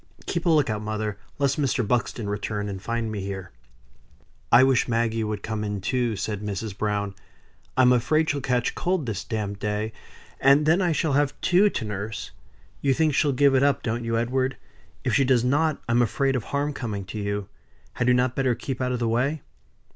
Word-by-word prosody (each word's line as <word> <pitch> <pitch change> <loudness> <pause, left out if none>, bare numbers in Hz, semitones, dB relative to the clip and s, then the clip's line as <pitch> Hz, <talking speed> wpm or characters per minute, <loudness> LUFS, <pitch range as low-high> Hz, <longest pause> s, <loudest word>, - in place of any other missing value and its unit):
Keep 170 0 -2
a - - +5
look 155 -4 +4
out, 105 -2 -2
mother, 105 -1 -3 0.2
lest 140 +1 +1
Mr. 125 -5 0
Buxton 115 -1 -1
returns 105 0 -3
and 95 -1 -6
find 115 +1 -2
me 105 - -3
here." 95 -1 -6 1.0
"I 120 +2 +8
wish 130 -1 +3
Maggie 115 -1 0
would 105 -1 -3
come 110 -1 -3
in 105 -1 -3
too," 120 +2 0
said 105 +1 -3
Mrs. 105 0 -4
Browne. 105 -1 -1 0.6
"I'm 125 -1 +6
afraid 155 +6 +2
she'll 145 -1 -1
catch 125 -2 0
cold 180 -4 -1
this 105 -4 -3
damp 100 -2 -3
day, 105 +1 -2 0.5
and 140 +2 +5
then 165 +5 +4
I 175 -2 +2
shall 155 -1 0
have 145 0 +1
two 190 +3 +4
to 115 - -3
nurse. 105 +1 -5 0.5
You 135 -2 +2
think 155 0 +2
she'll 145 +1 +3
give 140 +1 +4
it 130 - +4
up, 140 0 +2
don't 120 0 -2
you, 115 0 0
Edward? 130 +3 0 0.5
If - - 0
she 140 - +4
does 125 -2 +3
not 150 +4 +2
I'm 120 +1 +3
afraid 135 +4 +1
of 120 - -2
harm 145 +1 -1
coming 105 -7 -4
to 105 +3 -6
you. 100 -1 -2 0.5
Had 120 - -1
you 125 - +5
not 125 0 +1
better 130 -3 +1
keep 130 +2 -5
out 125 0 0
of 125 - 0
the 120 -1 -1
way?" 130 +6 0
120 Hz, 205 wpm, -25 LUFS, 105-135 Hz, 1.0 s, I